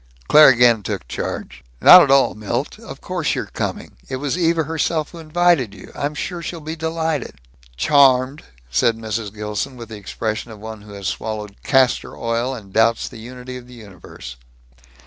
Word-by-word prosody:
Claire 150 0 +8
again 120 -3 +4
took 75 - -5
charge. - - -5 0.2
"Not 180 - +10
at 145 - +2
all, 135 0 +4
Milt. 100 - -4
Of - - -11
course - - -2
you're - - -3
coming. - - -5
It - - -3
was 140 +3 -2
Eva 165 -2 +1
herself 160 0 -1
who 170 - -10
invited 160 - +1
you. 95 - -13
I'm 145 +1 -3
sure 175 +3 -4
she'll 170 +1 -6
be 155 +1 -6
delighted." 160 -2 -2 0.4
"Charmed," 135 - +3 0.3
said 115 - +2
Mrs. 110 -1 -4
Gilson, 105 +5 -4
with 115 -2 -9
the 110 - -8
expression 110 +3 -4
of 110 - -10
one 110 0 -8
who 105 0 -13
has 100 -1 -9
swallowed 105 +2 -5
castor 135 -2 +1
oil 115 +3 -1
and 100 -5 -12
doubts 110 +1 +2
the 115 - -10
unity 125 +2 -9
of 125 -1 -12
the 125 - -13
universe. 95 - -11
125 Hz, 180 wpm, -20 LUFS, 110-150 Hz, 0.4 s, Not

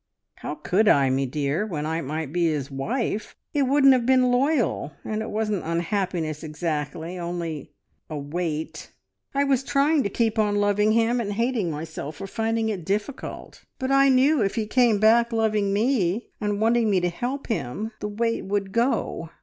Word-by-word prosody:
"How 150 - -5
could 185 +8 +1
I, 135 -6 +5
me 135 +1 0
dear, 145 +6 -1
when 160 -8 -3
I 160 +1 -1
might 150 +1 -4
be 175 -1 +2
his 145 -3 -2
wife? 215 - -3 0.2
It 280 -3 +2
wouldn't 275 0 +6
have 250 -2 +1
been 255 -1 +4
loyal. 250 - +1
And 215 0 -2
it 220 - -4
wasn't 210 -3 -1
unhappiness 170 -2 -2
exactly, 160 +2 -4
only 170 -4 -4 0.4
a 155 - -4
weight. 155 +2 -4 0.4
I 280 - +3
was 270 -2 +1
trying 285 +3 +2
to 200 - -1
keep 225 +1 0
on 210 -1 +2
loving 205 +1 +2
him, 230 +2 +2
and 205 -2 -3
hating 230 -4 0
myself 155 -1 -6
for 195 - -7
finding 225 +2 -1
it 195 -5 -3
difficult, 205 - -4
but 260 0 -2
I 275 0 +5
knew 265 +2 +4
if 195 -2 0
he 225 -2 -1
came 235 0 +3
back 230 +3 +4
loving 215 -3 +1
me, 210 -2 0
and 205 -1 -1
wanting 225 0 +3
me 195 -2 +3
to 175 - +1
help 250 +10 -4
him, 215 - -3
the 210 - -3
weight 230 +2 -1
would 195 0 -2
go. 230 -7 0
210 Hz, 180 wpm, -24 LUFS, 165-235 Hz, 0.4 s, wouldn't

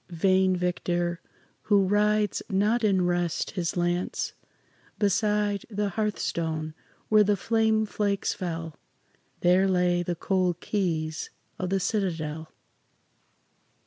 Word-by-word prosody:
Vain 185 +2 +2
victor 175 -1 -1 0.5
who 200 -2 +5
rides 210 +1 +2
not 210 +5 +2
in 190 -4 +3
rest 175 -1 0
his 180 -2 -2
lance!" 175 +1 -1 0.6
Beside 205 0 +1
the 205 -1 -1
hearthstone 165 -6 -2 0.4
where 215 -1 +6
the 205 0 +2
flame 220 +1 +2
flakes 205 -1 -1
fell, 165 -3 -5 0.6
There 185 +2 +4
lay 180 -1 +2
the 175 0 -2
cold 180 0 0
keys 160 -6 -2 0.3
of 185 - -2
the 195 +1 +1
citadel. 165 -6 -2
185 Hz, 110 wpm, -27 LUFS, 175-205 Hz, 0.6 s, where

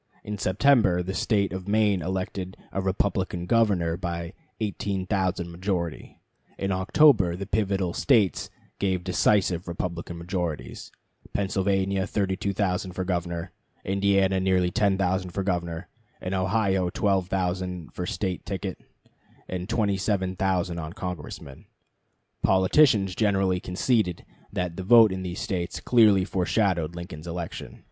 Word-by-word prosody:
In 105 -1 -5
September 95 -3 +3
the 95 +2 -4
State 100 -1 +1
of 95 0 -6
Maine 105 -3 +2
elected 95 +1 -4
a 95 - -2
Republican 95 -2 -1
governor 95 -6 +2
by 85 0 -4 0.3
18,000 95 -3 -1
majority. 85 -2 -3 0.4
In 100 0 -2
October 95 - +4
the 100 +2 -5
pivotal 100 -3 0
States 110 -9 +2 0.3
gave 95 -2 0
decisive 90 -1 +2
Republican 85 0 -4
majorities: 85 -7 -4 0.4
Pennsylvania 95 0 0
32,000 95 -2 -1
for 95 - -2
governor, 85 -2 -3 0.3
Indiana 95 -1 +2
nearly 95 -1 +2
10,000 95 -2 +1
for 95 +2 -3
governor, 85 -2 -2 0.3
and 90 - -4
Ohio 95 -1 +1
12,000 90 -2 -1
for 90 - -4
State 95 -1 -3
ticket 95 -2 -4 0.7
and 90 +2 -5
27,000 95 -4 0
on 80 0 -6
Congressmen. 80 -7 -7 0.8
Politicians 95 +1 +4
generally 95 -3 +1
conceded 90 0 0 0.3
that 90 -2 -3
the 95 - -4
vote 110 +1 +7
in 95 0 -3
these 90 0 -5
States 95 -6 -3
clearly 105 -6 +5
foreshadowed 90 -3 0
Lincoln's 85 -2 -8
election. 85 -1 -6
95 Hz, 115 wpm, -26 LUFS, 90-100 Hz, 0.8 s, vote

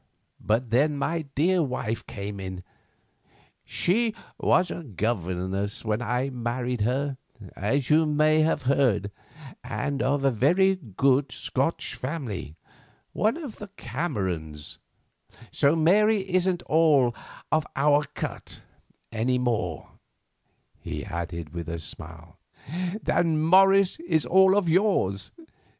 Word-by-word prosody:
But 115 +2 0
then 145 +5 +2
my 160 +3 -1
dear 175 +5 +3
wife 125 -6 -2
came 100 -2 -6
in. 95 -1 -6 1.0
She 225 +4 +1 0.2
was 180 - +2
a - - -5
governess 100 - -2
when 110 +1 0
I 125 +4 -1
married 120 0 -3
her, 135 +5 0 0.4
as 125 - -1
you 155 +1 +5
may 155 +1 +3
have 155 -2 +1
heard, 125 -7 +2 0.5
and 140 +2 -3
of 135 +1 +1
a 135 - +4
very 180 - +3
good 135 - +1
Scotch - - -2
family, 125 - -5 0.6
one 220 +7 +1
of 290 -10 -8
the 210 - -8
Camerons, 95 - -4 0.7
so 140 +3 +3
Mary 205 +6 +4
isn't 185 -1 +1
all 150 -6 +3 0.4
of 155 -1 +1
our 145 +1 +3
cut—any 120 +3 -5
more," 110 - -2 0.9
he - - -6
added 85 -1 -5
with 85 -1 -5
a 85 - -3
smile, 80 0 -10 0.6
"than 165 -3 +1
Morris 195 - +5
is 245 - 0
all 190 +1 +5
of 200 -4 +1
yours. 160 - +1
135 Hz, 115 wpm, -26 LUFS, 105-165 Hz, 1.0 s, you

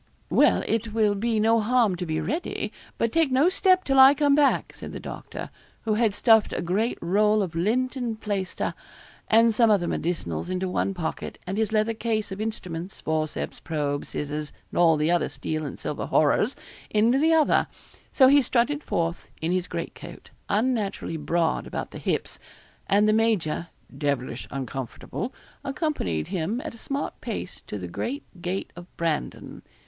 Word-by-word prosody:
'Well, - - +4
it 225 -1 -1
will 215 -2 +3
be 220 +2 0
no 225 +2 +4
harm 225 -3 +3
to 180 0 -4
be 155 0 -1
ready; 300 - -3 0.2
but 230 - +1
take 325 -4 +2
no 275 +7 +4
step 370 -1 +3
till 270 -1 +2
I 265 +2 +9
come 290 -1 +3
back,' 285 -1 +3
said - - -8
the - - -5
doctor, - - -7 0.3
who 220 - +1
had 215 -2 +2
stuffed 220 -2 +5
a - - -2
great 200 +7 0
roll 210 +4 +3
of 175 -4 -5
lint 235 - 0
and 235 -4 -3
plaister, 200 -4 -2 0.5
and 230 +1 +5
some 230 +1 +4
other 200 -5 +3
medicinals, 160 - -2
into 185 +1 -1
one 190 +1 -1
pocket, 160 -3 -4
and 185 +2 -3
his 220 0 0
leather 215 +1 +2
case 220 -2 -2
of 195 +2 -5
instruments, 185 -5 -5
forceps, 155 -1 -2
probe, 145 -3 -2
scissors, 150 0 -4 0.2
and - - -2
all 165 -2 +5
the 155 +3 +1
other 175 - +2
steel 155 0 -4
and - - -7
silver 150 - -4
horrors, 155 - +3 0.3
into 230 +5 +3
the 320 +2 +4
other; 310 -2 +3 0.4
so 260 - +6
he 285 +2 +6
strutted 265 +4 +1
forth 170 0 -2
in 160 +2 -1
his 180 -1 0
great - - -4
coat, - - -11 0.2
unnaturally 210 -5 0
broad 165 +2 0
about - - -5
the - - -8
hips; - - -2 0.5
and 205 +2 +4
the 215 - +4
major, 210 -8 +1 0.3
'devilish 140 -4 -2
uncomfortable,' 135 - -5 0.3
accompanied 270 - -2
him 190 +5 -1
at 310 - -5
a - - -12
smart 275 +4 -4
pace 215 -6 -5
to - - -4
the 90 -3 -5
great 265 - -4 0.2
gate 185 +3 -3
of 175 0 -10
Brandon. 165 -3 -3
210 Hz, 175 wpm, -26 LUFS, 165-235 Hz, 0.5 s, I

